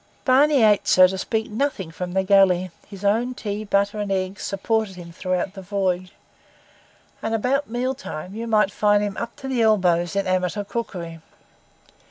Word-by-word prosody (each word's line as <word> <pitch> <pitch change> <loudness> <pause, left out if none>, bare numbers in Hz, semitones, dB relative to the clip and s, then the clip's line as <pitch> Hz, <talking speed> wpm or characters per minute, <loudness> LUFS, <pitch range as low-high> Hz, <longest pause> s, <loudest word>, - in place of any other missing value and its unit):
Barney 275 0 +4
ate, 210 -2 +4
so 185 - +7
to 185 +1 0
speak, 220 +3 -2
nothing 215 - -2
from 180 +2 -5
the 190 0 +1
galley; 185 -2 +4 0.2
his 200 -1 -9
own 235 +5 +1
tea, 210 -1 -4
butter, 200 0 0
and 205 -1 -3
eggs 190 +1 -2
supported 215 0 -1
him 175 -1 -10
throughout 185 +2 -2
the 195 - -9
voyage; 185 -1 -2 1.1
and 225 0 -1
about 260 +5 0
mealtime 240 - -4
you 230 +2 -5
might 215 -2 +4
often - - -20
find 205 0 +3
him 205 -2 -3
up 235 0 -5
to 270 - -8
the 260 -3 0
elbows 180 -5 +2
in 200 - 0
amateur 185 +2 0
cookery. 185 -7 -5
200 Hz, 175 wpm, -23 LUFS, 185-225 Hz, 1.1 s, so